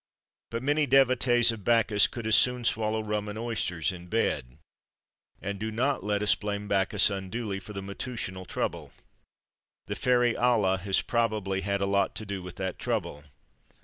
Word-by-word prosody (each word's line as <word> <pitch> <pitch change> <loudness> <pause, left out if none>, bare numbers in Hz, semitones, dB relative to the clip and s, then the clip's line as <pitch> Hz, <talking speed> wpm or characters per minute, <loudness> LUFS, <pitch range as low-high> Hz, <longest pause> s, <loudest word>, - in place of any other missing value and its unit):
But 115 +1 -4
many 145 +1 +2
devotees 125 -2 +4
of 110 -3 -8
Bacchus 110 -2 +4
could 120 -2 -7
as 110 -1 +5
soon 125 0 +3
swallow 110 -1 +1
rum 105 -1 -2
and 105 - -6
oysters, 110 -8 -1
in 90 -1 -10
bed. 75 - -1 0.8
And 100 0 -5
do 110 +1 -3
not 130 +2 0
let 105 0 0
us 105 - +5
blame 105 -1 -4
Bacchus 100 +1 +2
unduly 100 +1 -4
for 105 +2 -11
the 100 -1 -5
matutinal 100 -2 -5
trouble. - - -4 0.9
The - - -4
fairy 120 -2 +2
Ala 110 -6 +2
has 95 +1 +1
probably 105 -5 0
had 100 +1 -1
a - - +2
lot 100 0 +1
to 110 - -4
do 100 -2 -4
with 90 -1 -9
that 95 -1 -4
trouble. 85 -11 -3
105 Hz, 170 wpm, -28 LUFS, 95-115 Hz, 0.9 s, as